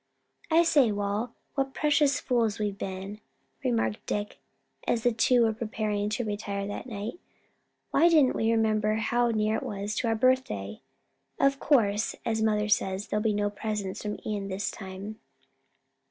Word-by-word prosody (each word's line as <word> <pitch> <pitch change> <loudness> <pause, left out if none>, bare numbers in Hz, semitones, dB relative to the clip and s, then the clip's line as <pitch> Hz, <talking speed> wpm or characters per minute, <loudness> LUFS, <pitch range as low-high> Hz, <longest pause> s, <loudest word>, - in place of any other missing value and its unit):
"I 330 +1 +5
say, 285 -8 +4
Wal, 205 +3 -2 0.2
what 270 -1 -2
precious 295 -2 +3
fools 230 -4 +1
we've 210 -2 -2
been," 195 +2 -5 0.4
remarked 110 -3 0
Dick 205 0 -3 0.5
as 230 -2 +1
the 245 - +4
two 235 +2 +4
were 225 -1 +2
preparing 215 -2 -2
to 220 +3 -1
retire 205 -1 -3
that 205 +5 -5
night; 220 - -5 0.7
"why 340 - +5
didn't 300 -6 +4
we 225 - +1
remember 215 -1 +2
how 240 +2 +1
near 215 -1 +1
it - - -4
was 205 +1 -4
to 235 - 0
our 225 - +2
birthday? 220 - 0 0.6
Of 275 0 +3
course, 215 -6 +2
as 220 -1 0
mother 210 -1 +2
says, 195 -1 0
there'll 210 - 0
be 220 0 +2
no 205 0 0
presents 205 -2 -4
from 210 0 -3
Ion 205 -2 -2
this 195 +1 -2
time." 195 +2 -8
215 Hz, 160 wpm, -28 LUFS, 205-235 Hz, 0.7 s, I